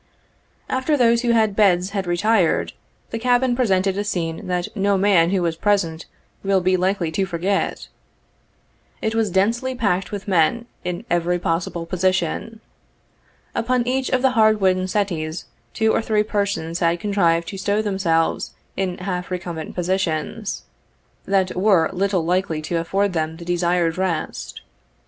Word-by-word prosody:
After 260 +4 0
those 235 -2 +4
who 240 - -1
had 220 -3 +3
beds 190 -3 +3
had 195 -3 -3
retired, 185 0 +2 0.4
the 230 - -3
cabin 245 +1 +2
presented 195 -5 +1
a - - 0
scene 165 -5 -3
that 180 +2 -2
no 200 -1 +2
man 190 -4 +4
who 185 -1 +1
was 165 -1 0
present 170 -4 0 0.4
will 195 -1 +3
be 185 +1 +2
likely 185 -2 0
to 195 +5 0
forget. 185 +4 -1 1.1
It 220 - -1
was 225 -2 +1
densely 230 +8 +1
packed 200 -6 0
with 205 -1 -6
men, 195 +6 +2 0.2
in 180 -1 -4
every 175 +1 +1
possible 170 0 -2
position. 185 +5 -1 0.9
Upon 245 +1 0
each 260 +1 0
of 255 0 +1
the 265 - +4
hard 220 -3 +4
wooden 185 -1 +2
settees 180 -5 -2 0.3
two 220 0 +1
or - - +2
three 215 -1 +1
persons 200 -6 -2
had 170 0 +1
contrived 170 -4 +1
to 195 - -6
stow 205 +2 0
them 200 -2 -2
selves 165 -3 0 0.2
in 185 -2 -2
half 180 -1 -4
recumbent 175 -3 -5
positions, 185 +3 -2 0.6
that 190 -1 +1
were 185 -4 +3
little 190 -2 0
likely 180 -2 0
to 165 +2 -1
afford 195 +4 0
them 160 -1 -2
the 170 - -10
desired 175 -1 +1
rest. 185 -4 -3
190 Hz, 155 wpm, -21 LUFS, 175-210 Hz, 1.1 s, those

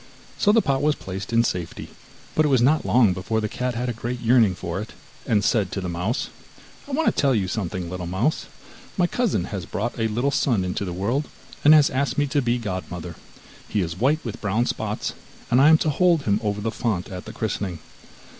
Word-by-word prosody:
So 205 - +4
the 225 +1 +4
pot 135 -1 +1
was 150 +1 +2
placed 95 +3 -7
in 115 0 +4
safety, 90 -7 -4 0.4
but 155 - +3
it - - +2
was 135 -3 +4
not 150 +5 +3
long 115 -7 +4
before 95 +5 -2
the 105 - -1
cat 125 +3 -3
had 125 +2 -2
a 120 - -1
great 120 +2 -4
yearning 115 -5 +4
for 85 +2 -4
it, 110 - -8 0.3
and 105 -2 +2
said 100 -4 +1
to - - -2
the 95 - -4
mouse: 90 +8 -2 0.6
'I 285 - -7
want 320 +3 +1
to - - +6
tell 135 -3 +3
you 100 -4 0
something, 90 -3 -3
little 90 0 -5
mouse; 95 - -1 0.5
my 180 - +4
cousin 230 - 0
has 95 -2 -5
brought 110 +3 -3
a 110 - +2
little 120 +6 0
son 115 -9 +1
into 90 +2 -2
the 90 - -4
world, 115 +11 -1 0.4
and 150 +2 +8
has 150 -2 +5
asked 135 +2 -1
me 145 - +3
to 145 +1 0
be 120 -1 +1
godmother; 90 -5 -5 0.6
he 105 - 0
is 85 -2 -3
white 150 +5 +1
with 115 0 -6
brown 110 +3 +1
spots, - - -3 0.4
and 125 +2 +5
I 145 - +7
am 160 - +7
to 155 - 0
hold 170 0 +3
him 105 -4 +1
over 105 -1 -1
the 110 +2 -1
font 105 -6 -2
at 90 -1 -7
the - - -7
christening. 100 -5 -3
115 Hz, 225 wpm, -23 LUFS, 95-135 Hz, 0.6 s, and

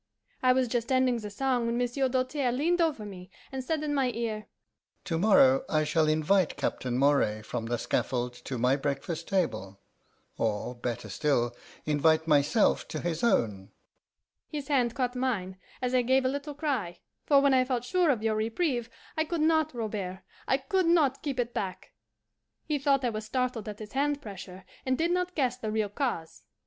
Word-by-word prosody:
I 255 - +5
was 255 0 +2
just 235 +1 -2
ending 255 -2 +3
the 210 -2 -6
song 245 +2 0
when 235 0 0
Monsieur 245 +2 0
Doltaire 255 +1 0
leaned 335 +8 +1
over 300 -10 0
me, 185 -3 -9 0.2
and 265 -1 -4
said 310 +3 -1
in 295 -1 -1
my 270 -3 +2
ear, 220 -2 -3 0.6
'To 165 -2 -2
morrow 265 +6 +5
I 155 -1 +2
shall 155 +1 +2
invite 155 +4 +2
Captain 125 -3 -2
Moray 130 -6 +2
from 115 +1 -4
the 120 +1 0
scaffold 125 +1 -1
to 130 - -3
my 125 +3 +3
breakfast 145 +4 -3
table 100 - -1 0.6
or, 110 +2 -1
better 120 -1 -4
still, 120 -5 0 0.3
invite 155 +2 +3
myself 150 +7 +3
to - - -4
his 170 +1 -2
own.' 105 - +1 0.7
His 290 -2 -6
hand 245 -5 +2
caught 250 -2 -1
mine, 200 -8 -2 0.2
as 250 0 0
I 255 - +4
gave 260 +2 +2
a - - +3
little 285 +2 -4
cry; 260 - -2 0.3
for 285 -2 +6
when 280 -1 +4
I 255 -1 +5
felt 250 -2 -1
sure 355 +5 +2
of 240 -6 +1
your 220 -1 +2
reprieve, 230 +3 -1 0.3
I 315 - +2
could 335 +1 -3
not, 315 0 +3
Robert, 210 -6 -4 0.3
I 265 - +3
could 375 +6 0
not 305 -6 +3
keep 275 -4 -3
it 240 0 -1
back. 190 -2 -4 0.7
He 300 -2 -1
thought 275 -1 +2
I 240 - +1
was 215 0 -5
startled 250 -2 -2
at 205 - -7
his 215 -1 -9
hand 285 +1 +1
pressure, 190 -6 -9 0.2
and 260 -1 0
did 335 +2 +1
not 360 0 -1
guess 255 -4 +1
the 220 -4 -4
real 215 -1 0
cause. 205 - -3
235 Hz, 185 wpm, -29 LUFS, 170-270 Hz, 0.7 s, for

